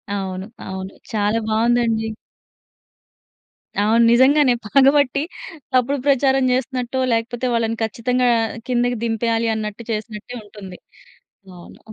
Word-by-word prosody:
అవును. 190 -1 -4 0.2
అవును. 190 0 -6 0.2
చాలా 210 +1 +1
బావుందండి. 225 0 +1 1.7
అవును. 225 +3 +3
నిజంగానే 260 +2 +5
పగబట్టి 275 +3 +3 0.5
తప్పుడు 255 +3 +2
ప్రచారం 270 -1 +3
చేస్తున్నట్టో, 255 0 -2
లేకపోతే 230 +2 -2
వాళ్ళను 230 -1 0
ఖచ్చితంగా 245 +3 0
ఆహ్, 225 0 -2
కిందకి 245 -1 0
దింపెయ్యాలి, 230 0 0
అన్నట్టు 215 +1 -5
చేసినట్టే 215 +2 -5
ఉంటుంది. 200 -3 -11 0.8
అవును. 175 - -14
230 Hz, 100 wpm, -20 LUFS, 215-255 Hz, 1.7 s, నిజంగానే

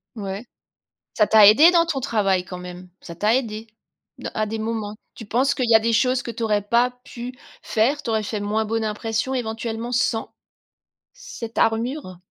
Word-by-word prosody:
Ouais, 200 +1 -5 0.7
ça 210 -3 +4
t'a 215 -1 +7
aidé 285 - +8
dans 340 -1 +4
ton 320 -5 -2
travail 200 -8 0
quand 180 0 -7
même? 180 0 -10
Ça 170 - -9
t'a 210 +6 +2
aidé? 225 -3 -3 0.5
De - - -6
à 215 - 0
des 220 +1 -4
moments? 220 -1 -3 0.2
Tu 225 - -9
penses 255 +6 +1
qu'il 255 -4 -1
y 230 - +6
a - - +8
des 230 +1 0
choses 250 +2 +2
que 235 - -5
tu 230 +1 -5
aurais 210 -2 +1
pas 235 +5 +2
pu 245 +1 -8 0.3
faire, 260 +7 +1
tu 265 - -6
aurais 220 -1 0
fait 210 0 -3
moins 210 +2 -1
bonne 225 +1 -1
impression 225 +4 -2
éventuellement, 230 -1 -4
sans 235 -2 0 0.8
cette 235 - -9
armure? 225 - 0
225 Hz, 190 wpm, -22 LUFS, 210-245 Hz, 0.8 s, aidé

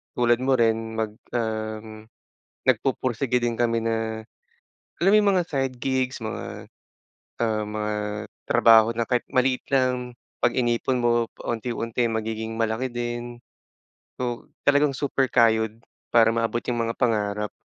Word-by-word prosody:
tulad 120 0 +3
mo 130 0 +2
rin 115 -1 +1
mag 110 -1 -1 0.2
um, 110 -1 -4 0.6
nagpupursigi 130 0 +1
din 120 -1 -1
kami, 115 0 +1
na 110 -1 -2 0.8
alam 195 - +5
mo 210 - +6
yung 205 -1 +4
mga 180 - +3
side 135 -3 -1
gigs 130 -2 -1
mga 110 - -6 0.7
ah, 110 -2 0
mga 105 0 -2 0.6
trabaho 115 0 +6
na 115 - +1
kahit 120 +1 -1
maliit 130 0 +2
lang, 125 -2 0 0.2
'pag - - +2
inipon 120 0 +1
mo 120 -1 +2
pa-unti-unti 115 0 -2
magiging 110 0 -3
malaki 115 +3 0
din. 120 0 -5 0.8
So 120 -1 -3 0.2
talagang 145 0 +4
super 135 -1 0
kayod 110 -2 +2 0.3
para 115 -1 +7
maabot 115 +1 -1
yung 120 -1 -1
mga 115 - -1
pangarap. 105 -3 0
120 Hz, 135 wpm, -25 LUFS, 110-125 Hz, 0.8 s, para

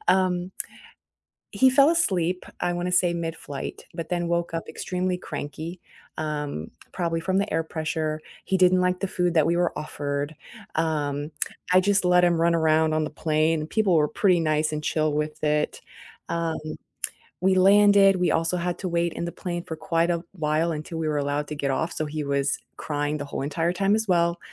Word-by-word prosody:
Um 185 -1 +2 1.0
he 260 0 +5
fell 275 +2 +6
asleep, 185 - +1 0.2
I 175 - +1
wanna 175 +1 -2
say 175 -1 +3
midflight, 165 -4 -5
but 165 -1 -5
then 175 -1 -1
woke 170 -1 -1
up 165 - -4
extremely 180 0 -2
cranky, 160 +1 -6 0.4
um, 150 - -3 0.2
probably 165 -2 -1
from 190 +2 0
the 200 +1 -1
air 165 0 +1
pressure, 155 -1 -3 0.2
he 190 - +1
didn't 185 0 +5
like 180 0 +1
the 195 - -1
food 180 -2 0
that 155 -2 +4
we 170 +1 +2
were 175 0 0
offered, 145 0 -3 0.4
um, 150 -2 -1 0.4
I 185 - +7
just 200 0 +2
let 180 0 +5
him 170 -2 +3
run 170 0 +3
around 160 -1 +3
on 155 0 +1
the 150 - -4
plane, 155 +1 +1
and 155 - -6
people 215 -5 +2
were 150 -1 +3
pretty 185 -1 +3
nice 155 -1 +1
and 150 0 -3
chill 155 0 +1
with 150 +1 -3
it, 150 0 0 0.5
um, 165 -1 -1 0.8
we 190 +1 +3
landed, 200 +1 +6
we 180 -1 +1
also 165 +2 +1
had 175 0 -2
to 185 - -2
wait 170 -1 0
in - - -3
the 170 - -4
plane 175 -2 -4
for 160 - -5
quite 165 +2 +1
a 170 -1 0
while 160 -1 0
until 160 +2 -5
we 160 - -1
were 150 - 0
allowed 145 +1 -1
to 150 - -4
get 140 -1 -1
off, 160 +5 -1
so 155 - -2
he 150 +1 -4
was 140 0 0 0.2
crying 145 0 -2
the 145 - -4
whole 140 - -4
entire 165 +4 0
time 195 +2 +2
as 220 0 -1
well, 170 -2 +2
165 Hz, 195 wpm, -25 LUFS, 155-180 Hz, 1.0 s, I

